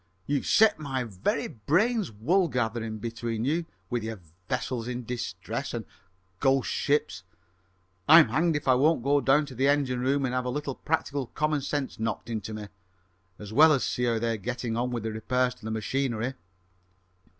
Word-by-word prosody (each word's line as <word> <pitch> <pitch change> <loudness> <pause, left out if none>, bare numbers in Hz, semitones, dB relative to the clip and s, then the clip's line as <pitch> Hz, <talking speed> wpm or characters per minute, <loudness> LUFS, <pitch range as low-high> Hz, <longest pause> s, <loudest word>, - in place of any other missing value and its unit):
"You've 145 -1 -1
set 220 -5 +5
my 135 -4 -2
very 100 -5 -2
brains 185 - +1
wool 165 - +2
gathering 115 -4 -2
between 115 +1 -3
you, 165 +4 0 0.2
with 120 -1 0
your 110 -1 -5 0.3
`vessels 125 -1 -2
in 125 0 -4
distress' 115 +2 -4
and 115 -3 -4 0.6
`ghost 135 -1 +3
ships'; 145 -9 0 0.9
I'm 160 -5 +9
hanged 160 +6 +2
if 145 -1 -3
I 130 - +6
won't 145 +1 +3
go 140 +1 +3
down 145 +3 +3
to 140 - -10
the 130 +3 +1
engine 140 -3 +2
room 135 +2 +1
and 125 - -2
have 125 0 -1
a - - -1
little 140 +1 -3
practical 145 -3 -2
common 150 +1 -1
sense 140 -2 -3
knocked 115 +1 -3
into 110 -1 -4
me, 105 -1 -6 0.7
as 105 0 -9
well 155 +6 +7
as 140 -4 +2
see 125 - -1
how 115 -1 +1
they're 115 0 -1
getting 120 +2 -3
on 120 +2 0
with 120 -3 -3
the 110 - -2
repairs 125 +3 0
to 125 - -16
the - - -3
machinery!" 120 +2 -1
125 Hz, 180 wpm, -27 LUFS, 115-145 Hz, 0.9 s, I'm